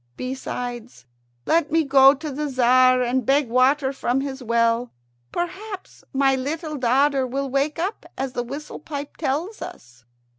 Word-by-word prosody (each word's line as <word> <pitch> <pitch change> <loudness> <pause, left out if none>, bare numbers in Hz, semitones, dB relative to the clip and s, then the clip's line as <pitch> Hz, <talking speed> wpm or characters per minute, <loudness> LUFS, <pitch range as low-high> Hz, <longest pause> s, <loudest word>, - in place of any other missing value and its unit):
Besides, 245 - -5 0.4
let 320 -2 +2
me 325 0 +3
go 275 -1 +6
to 300 +1 -6
the 295 +2 -3
Tzar 255 0 +4
and 250 +1 0
beg 270 +1 +2
water 265 +3 +3
from 265 -1 0
his 275 -1 -5
well. 235 0 +1 0.4
Perhaps 385 +3 -6
my 270 0 +3
little 305 +4 -3
daughter 265 +2 +2
will 270 +1 -3
wake 275 +3 0
up, 370 +6 -3
as 265 -1 -3
the 245 - -1
whistle 275 +5 -7
pipe 285 -2 -7
tells 320 +9 -2
us." 120 -1 -10
270 Hz, 150 wpm, -23 LUFS, 250-295 Hz, 0.4 s, go